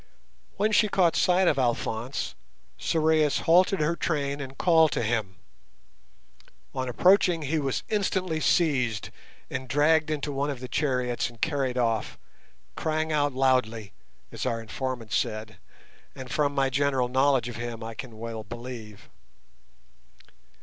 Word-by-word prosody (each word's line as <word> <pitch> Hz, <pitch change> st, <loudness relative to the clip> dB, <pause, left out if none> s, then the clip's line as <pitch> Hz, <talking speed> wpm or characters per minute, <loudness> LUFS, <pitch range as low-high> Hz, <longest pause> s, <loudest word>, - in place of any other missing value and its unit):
When 210 Hz, +2 st, +1 dB
she 215 Hz, 0 st, +4 dB
caught 180 Hz, -4 st, +2 dB
sight 180 Hz, +1 st, +3 dB
of 145 Hz, -, +3 dB
Alphonse, 120 Hz, 0 st, -2 dB, 0.5 s
Sorais 155 Hz, -2 st, +2 dB
halted 185 Hz, +4 st, +4 dB
her 160 Hz, +3 st, +1 dB
train 145 Hz, -4 st, -2 dB
and 135 Hz, 0 st, -8 dB
called 160 Hz, -3 st, +4 dB
to -, -, -1 dB
him. 110 Hz, -4 st, -1 dB, 1.4 s
On 130 Hz, -1 st, -3 dB
approaching 180 Hz, -, +4 dB
he 155 Hz, +3 st, 0 dB
was 135 Hz, -3 st, -2 dB
instantly 185 Hz, -5 st, 0 dB
seized 130 Hz, -, +1 dB, 0.4 s
and 130 Hz, -1 st, -4 dB
dragged 155 Hz, +4 st, +3 dB
into 150 Hz, -1 st, -2 dB
one 140 Hz, +1 st, -1 dB
of 140 Hz, -3 st, -4 dB
the 125 Hz, -, -6 dB
chariots 125 Hz, -5 st, -1 dB
and 120 Hz, -1 st, -17 dB
carried 135 Hz, -5 st, -1 dB
off, 115 Hz, -3 st, 0 dB, 0.6 s
"crying 155 Hz, 0 st, -1 dB
out 145 Hz, -2 st, +1 dB
loudly", 125 Hz, -5 st, +1 dB, 0.4 s
as -, -, -5 dB
our 115 Hz, -3 st, -1 dB
informant 115 Hz, 0 st, -5 dB
said, 110 Hz, 0 st, -2 dB, 0.6 s
and 130 Hz, -1 st, -8 dB
as -, -, -3 dB
from 145 Hz, -2 st, +1 dB
my 135 Hz, -1 st, +1 dB
general 135 Hz, -2 st, +1 dB
knowledge 130 Hz, -1 st, +2 dB
of 120 Hz, -3 st, -6 dB
him 120 Hz, -1 st, -5 dB
I 115 Hz, 0 st, -6 dB
can 115 Hz, -1 st, -9 dB
well 115 Hz, -1 st, -6 dB
believe. 115 Hz, -2 st, -9 dB
135 Hz, 145 wpm, -27 LUFS, 120-155 Hz, 1.4 s, she